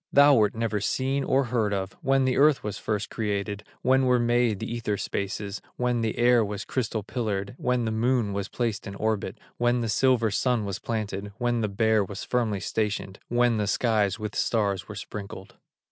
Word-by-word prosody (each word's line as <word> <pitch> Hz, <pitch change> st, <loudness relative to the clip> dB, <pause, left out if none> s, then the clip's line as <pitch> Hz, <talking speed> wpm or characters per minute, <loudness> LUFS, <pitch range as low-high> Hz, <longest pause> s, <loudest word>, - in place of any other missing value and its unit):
Thou 140 Hz, +1 st, +7 dB
wert 110 Hz, -5 st, +3 dB
never 110 Hz, -2 st, -1 dB
seen 135 Hz, +6 st, 0 dB
or 135 Hz, +1 st, +2 dB
heard 115 Hz, -4 st, 0 dB
of 95 Hz, 0 st, -3 dB
When 135 Hz, 0 st, +3 dB
the 130 Hz, -, +1 dB
earth 150 Hz, 0 st, +4 dB
was 105 Hz, -1 st, -4 dB
first 105 Hz, -2 st, -2 dB
created, 105 Hz, -1 st, -2 dB, 0.2 s
When 130 Hz, +1 st, +4 dB
were 125 Hz, 0 st, +4 dB
made 120 Hz, -2 st, +2 dB
the 110 Hz, -, -5 dB
ether 110 Hz, -3 st, -2 dB
spaces, 100 Hz, +1 st, -3 dB
When 125 Hz, -1 st, 0 dB
the 110 Hz, -1 st, -1 dB
air 120 Hz, -1 st, +5 dB
was 105 Hz, 0 st, -4 dB
crystal 115 Hz, -4 st, -2 dB
pillared, 105 Hz, -3 st, -3 dB
When 125 Hz, -1 st, +1 dB
the 110 Hz, -, -1 dB
Moon 115 Hz, -1 st, +1 dB
was 100 Hz, 0 st, -2 dB
placed 115 Hz, -3 st, -2 dB
in 100 Hz, -, -6 dB
orbit, 110 Hz, 0 st, -1 dB, 0.2 s
When 120 Hz, 0 st, +2 dB
the 115 Hz, -, -2 dB
silver 120 Hz, -2 st, +3 dB
Sun 120 Hz, 0 st, +1 dB
was 100 Hz, -1 st, -4 dB
planted, 105 Hz, -3 st, -4 dB
When 120 Hz, -1 st, 0 dB
the 105 Hz, -, 0 dB
Bear 110 Hz, +1 st, +2 dB
was 95 Hz, 0 st, -6 dB
firmly 110 Hz, -6 st, 0 dB
stationed, 105 Hz, -3 st, -2 dB
When 120 Hz, -1 st, +2 dB
the 105 Hz, -1 st, 0 dB
skies 105 Hz, -3 st, +1 dB
with 105 Hz, -1 st, -5 dB
stars 100 Hz, -6 st, 0 dB
were -, -, -8 dB
sprinkled." 100 Hz, -2 st, -8 dB
110 Hz, 190 wpm, -26 LUFS, 100-120 Hz, 0.2 s, Thou